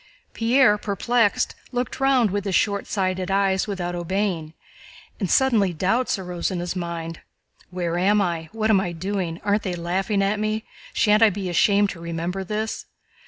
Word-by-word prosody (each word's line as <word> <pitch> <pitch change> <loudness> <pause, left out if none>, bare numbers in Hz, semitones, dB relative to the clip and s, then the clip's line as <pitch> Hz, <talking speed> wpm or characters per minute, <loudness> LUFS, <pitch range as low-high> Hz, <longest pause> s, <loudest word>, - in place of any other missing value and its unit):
Pierre, 230 -2 +4
perplexed, 210 +2 +1 0.2
looked 245 -1 -3
round 265 -6 +3
with 205 0 -2
his 195 -3 0
shortsighted 190 -2 0
eyes 195 0 +1
without 180 -4 -3
obeying, 175 -2 -2 0.6
and 190 -5 -1
suddenly 225 -9 +3
doubts 205 +9 +1
arose 180 -2 -3
in 185 - -3
his 175 +2 -3
mind. 170 -2 -4 0.5
"Where 175 -1 -2
am 205 +3 +3
I? 170 -4 -1
What 220 0 0
am 195 -3 +4
I 175 -2 -3
doing? 180 -1 -3
Aren't 205 +1 +1
they 185 -3 -3
laughing 190 +4 0
at 205 +2 0
me? 215 +1 -1 0.3
Shan't 215 - +3
I 225 - +7
be 195 -2 -4
ashamed 200 +3 +3
to 175 - -10
remember 170 +3 -3
this?" 215 +3 -3
195 Hz, 165 wpm, -23 LUFS, 175-210 Hz, 0.6 s, I